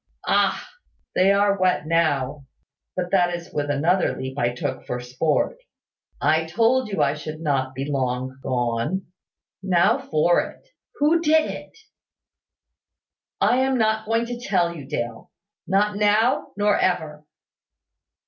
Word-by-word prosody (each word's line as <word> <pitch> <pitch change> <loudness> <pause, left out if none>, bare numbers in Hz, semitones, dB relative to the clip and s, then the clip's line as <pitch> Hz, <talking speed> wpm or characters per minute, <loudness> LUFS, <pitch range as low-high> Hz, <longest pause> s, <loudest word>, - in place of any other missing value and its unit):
Ah! - - +1 0.5
They 190 +2 +4
are 200 0 +2
wet 185 -4 +2
now; 145 -4 0 0.5
but 180 -1 -3
that 175 -2 +3
is 170 0 -10
with 145 -1 -2
another 165 +6 +1
leap 130 0 -5
I 120 -4 0
took 120 - -4
for 125 - -3
sport. 130 - -1 0.6
I 160 +1 +2
told 230 +7 +2
you 195 - +1
I 140 - +2
should 155 +1 -7
not 135 -4 -1
be 135 +1 -3
long 130 -2 -2
gone. 125 +9 -1 0.6
Now 190 +6 +3
for 175 - +2
it! - - -10 0.3
Who 315 +3 +3
did 315 -1 +3
it?" - - -10 1.6
"I 245 - +3
am 260 0 +2
not 220 -1 +1
going 230 +1 +1
to 240 0 -6
tell 180 -7 0
you, 145 -4 -9
Dale, 120 -3 -4 0.4
not 205 +2 +2
now, 210 +4 +2
nor 205 0 +3
ever." 155 -4 -1
175 Hz, 140 wpm, -23 LUFS, 140-210 Hz, 1.6 s, They